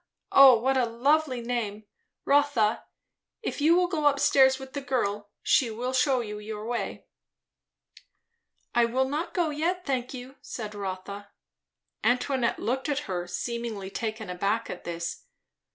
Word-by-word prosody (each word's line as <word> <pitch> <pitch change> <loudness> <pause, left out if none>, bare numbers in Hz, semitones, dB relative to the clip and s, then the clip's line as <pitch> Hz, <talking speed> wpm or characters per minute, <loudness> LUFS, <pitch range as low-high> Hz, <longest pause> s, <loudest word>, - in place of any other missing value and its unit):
O 270 -3 +9
what 265 +4 +1
a 250 -2 +2
lovely 260 +2 +1
name! 230 -3 -3 0.4
Rotha, 280 -7 +2 0.6
if - - -3
you 320 +3 +5
will 360 0 +4
go 320 -5 +1
up 280 -1 +3
stairs 265 -1 +5
with 265 -1 -10
the 285 - -3
girl, 210 -6 -2
she 250 - +3
will 245 +4 -3
shew 260 -1 +2
you 210 -1 -6
your 210 0 -6
way." 240 +1 -4 1.7
"I 240 -1 +4
will 260 +3 +1
not 300 +5 -3
go 340 -4 +1
yet, 345 +5 -1
thank 255 -3 -2
you," 260 +1 -9
said 215 -3 -6
Rotha. 200 0 -6 0.7
Antoinette 250 0 +1
looked 265 +5 -2
at 290 0 -1
her, 175 -2 -3
seemingly 220 +1 -4
taken 220 -1 -4
aback 200 +5 -1
at - - -8
this. 170 0 -5
245 Hz, 150 wpm, -27 LUFS, 215-275 Hz, 1.7 s, O